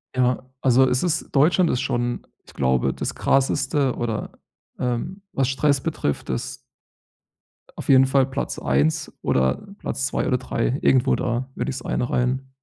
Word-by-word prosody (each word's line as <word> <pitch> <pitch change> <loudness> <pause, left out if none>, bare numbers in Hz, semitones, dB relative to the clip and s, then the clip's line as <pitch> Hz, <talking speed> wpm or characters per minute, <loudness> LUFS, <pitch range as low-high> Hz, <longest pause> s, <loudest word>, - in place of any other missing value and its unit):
Ja, 125 0 +1
also, 130 0 +5
es 125 0 +1
ist 170 -2 -1
Deutschland 165 +5 +4
ist 125 - 0
schon, 120 0 -2 0.2
ich - - -17
glaube, 65 0 +1
das - - -4
krasseste 135 0 +1
oder, 115 -3 -3 0.5
ähm 125 - -2
was 135 -1 +1
Stress 140 0 +2
betrifft, 150 - -2
ist 65 - -3 1.2
auf - - -7
jeden 130 -1 +7
Fall 135 0 +3
Platz 135 +1 -4
1 70 +4 0
oder 65 0 +1 0.2
Platz 135 -9 -3
2 - - -1
oder 125 - +1
3. 125 +1 -1
Irgendwo 130 0 +3
da 120 +1 -2
würde - - -3
ich's 130 -2 -5
einreihen. 125 +2 -1
130 Hz, 150 wpm, -23 LUFS, 120-135 Hz, 1.2 s, jeden